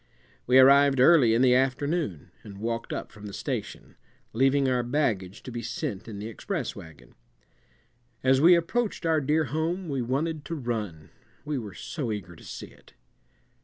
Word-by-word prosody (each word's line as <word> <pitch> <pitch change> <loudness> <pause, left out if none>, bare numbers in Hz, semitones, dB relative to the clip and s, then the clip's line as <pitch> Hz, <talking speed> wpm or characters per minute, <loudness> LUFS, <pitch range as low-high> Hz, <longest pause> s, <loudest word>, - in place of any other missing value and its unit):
We 125 +2 +5
arrived 140 +1 +6
early 130 -5 +6
in 120 - +3
the 125 -1 +5
afternoon 135 - -1
and 100 -2 -11
walked 115 +2 -3
up - - -5
from 105 -1 -11
the 100 - -9
station, - - -5 0.4
leaving 135 +3 +3
our 125 -1 +1
baggage 115 -8 -1
to 130 - -8
be 120 0 -5
sent 105 -2 -5
in 110 -3 -7
the 105 - -6
express 140 - -4
wagon. 80 -6 -13 1.1
As 130 +1 +4
we 175 +3 +8
approached 200 +5 -1
our 160 -2 +2
dear 150 +3 +1
home 160 +6 -2
we 135 -3 -1
wanted 145 +6 -2
to 170 - -4
run, 110 - -5 0.3
we 150 -3 -2
were 105 -6 -8
so 140 -9 -4
eager 90 -5 -6
to - - -16
see - - -8
it. - - -21
130 Hz, 170 wpm, -27 LUFS, 110-150 Hz, 1.1 s, we